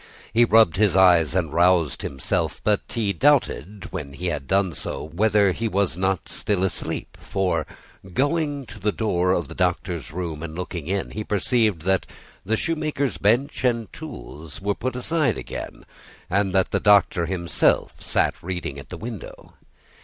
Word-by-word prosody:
He 120 +1 +6
rubbed 110 -6 +5
his 105 -2 +3
eyes 90 -4 +5
and 80 -5 0
roused 85 -3 +3
himself; 65 -2 -2
but 105 -2 +2
he 105 -4 -1
doubted, 105 - +1
when 75 -7 -6
he 90 +5 -3
had 70 -4 -4
done 95 -1 +2
so, - - -4
whether 100 +5 +2
he 115 +5 -2
was 100 -4 0
not 95 0 -1
still 100 -3 -1
asleep. 95 - -3
For, 90 -5 -1 0.4
going 145 - 0
to 105 -1 -11
the 105 +2 +1
door 90 -5 +1
of 85 -5 0
the - - -9
Doctor's - - -1
room 85 -2 -4
and 80 -1 -6
looking 90 -3 -5
in, 95 +1 -2
he 110 - -4
perceived 105 -3 +1
that 95 +1 +1 0.4
the 110 +4 0
shoemaker's 155 - -1
bench 120 +8 +1
and 115 -5 0
tools 75 +5 -9
were 100 +1 0
put 130 +4 -4
aside 150 +4 +1
again, - - -7 0.5
and 100 0 +2
that 95 0 +2
the - - +1
Doctor 100 -5 +4
himself 85 -2 +1
sat - - +2
reading 90 -6 -4
at - - -12
the - - -7
window. 115 -4 -8
95 Hz, 165 wpm, -23 LUFS, 85-110 Hz, 0.5 s, He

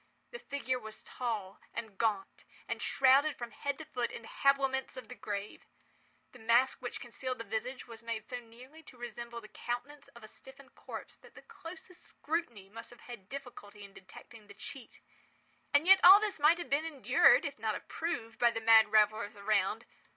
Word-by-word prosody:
The 480 - -8
figure 260 - -3
was 220 -1 -10
tall 215 -6 -4 0.2
and 220 -4 -6
gaunt, 210 -4 -1 0.2
and - - -4
shrouded 275 +3 +4
from 240 -1 -6
head 280 +5 -3
to 315 - -9
foot 245 -4 -3
in - - -8
the - - -11
habiliments 270 -1 +1
of 250 -3 -9
the - - -7
grave. 205 -1 -6 0.6
The 245 - -15
mask 235 +3 +3
which 245 - -5
concealed 255 +1 -5
the 230 - -6
visage 240 +4 -4
was 230 -1 -11
made 230 -2 -5
so 250 - -5
nearly 245 +7 -15
to 280 -5 -16
resemble 235 -1 -7
the 215 - -12
countenance 275 +7 -6
of 235 - -13
a - - -9
stiffened 265 +4 -15
corpse - - -9
that - - -19
the - - -13
closest 365 +2 -12
scrutiny 290 - -4
must 230 +3 -10
have 240 - -16
had 230 -6 -11
difficulty 225 -7 -9
in 200 -1 -13
detecting 210 +3 -14
the 200 - -13
cheat. 265 +3 -10 0.7
And 285 +2 +3
yet 385 +1 +8
all 385 +3 +11
this 420 -5 -2
might 305 +4 +5
have 345 - -7
been 285 +3 +2
endured, 310 -5 +4
if - - -5
not - - -1
approved, 235 -9 -5
by 240 - +5
the 230 - -3
mad 220 -1 +6
revellers 215 -1 +3
around. 205 +2 0
240 Hz, 190 wpm, -32 LUFS, 220-275 Hz, 0.7 s, all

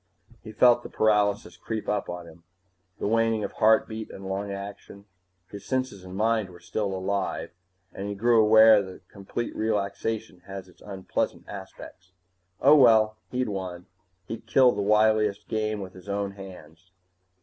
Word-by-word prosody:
He 110 - -10
felt 120 +1 +5
the - - -9
paralysis 105 -4 +1
creep 110 +2 -5
up 105 -2 -1
on 90 0 -6
him, 85 0 -15 0.6
the - - -4
waning 115 0 +1
of - - -3
heartbeat 110 0 +2
and 95 0 -9
lung 100 +1 -3
action. 100 0 -9 0.5
His 100 -1 -9
senses 130 -7 -3
and 95 0 -9
mind 110 -1 +1
were 90 -1 -14
still 100 +4 -3
alive, 95 -1 -2 0.4
and 100 +1 -5
he 100 - -4
grew 115 +2 +4
aware 110 0 +7
that 95 -1 -11
complete 100 +4 -5
relaxation 105 -1 -2
has 95 -1 -8
its 90 - -21
unpleasant 95 -2 -4
aspects. 95 -1 -11 0.5
Oh, 145 +3 +7
well 110 -4 +5
he'd 125 -2 -2
won. 90 -3 -5 0.4
He'd 115 +3 -8
killed 125 +2 +5
the - - 0
wiliest 105 0 +2
game 110 -1 -2
with 95 -1 -8
his 95 +2 -13
own 100 0 -2
hands. 95 -3 -13
100 Hz, 160 wpm, -26 LUFS, 95-110 Hz, 0.6 s, aware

